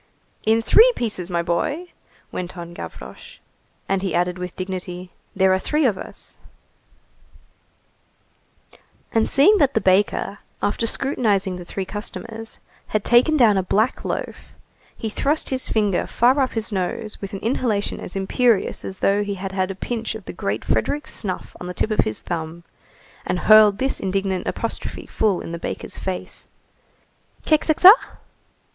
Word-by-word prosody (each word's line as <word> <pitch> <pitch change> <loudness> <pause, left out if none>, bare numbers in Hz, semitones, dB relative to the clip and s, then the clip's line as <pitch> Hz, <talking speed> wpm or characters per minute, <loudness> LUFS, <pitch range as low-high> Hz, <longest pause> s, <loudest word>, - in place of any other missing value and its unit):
"In 225 +1 +3
three 460 - +7
pieces, 205 -7 -3
my 170 -1 0
boy!" 295 - -2 0.4
went 180 0 -6
on 170 0 -8
Gavroche. 480 - -10 0.5
And 195 -1 0
he 190 -4 -2
added 180 +1 0
with 180 0 -6
dignity:— 185 -1 -6 0.2
"There 190 -1 +4
are 190 - +2
three 300 +8 0
of 225 -6 +3
us." - - -11 2.7
And 225 -1 +2
seeing 380 +10 +5
that 280 -3 +2
the - - +4
baker, 200 +1 +1 0.2
after 230 +3 -1
scrutinizing 205 -9 0
the 180 - -9
three 190 +2 -4
customers, 220 +2 -6 0.3
had 215 -2 -1
taken 255 +6 +4
down 215 -7 +5
a - - +2
black 215 +6 0
loaf, - - -5 0.4
he 225 - -4
thrust 285 +8 0
his 260 0 0
finger 205 -4 +1
far 255 +4 +3
up 265 -2 +1
his 225 0 -2
nose 200 +3 -3
with 195 0 -6
an 195 - -4
inhalation 225 -3 -1
as - - -8
imperious 205 +3 +1
as 190 - -6
though 200 +1 +3
he 205 -1 -3
had 195 0 -5
had 190 -1 -1
a 195 - -4
pinch 225 +2 -4
of 215 -4 -9
the - - -7
great 105 - -3
Frederick's 285 - -1
snuff 190 -5 -2
on 180 - -5
the 180 - -6
tip 220 - -1
of 215 - +2
his 110 - -3
thumb, 165 0 -5 0.6
and 180 0 -2
hurled 215 -2 +7
this 265 +3 0
indignant 190 -1 -2
apostrophe - - -4
full 205 -5 0
in - - -7
the 170 - -5
baker's - - -6
face:— 190 -1 -5 1.0
"Keksekça?" 315 +4 +7
200 Hz, 160 wpm, -22 LUFS, 185-235 Hz, 2.7 s, three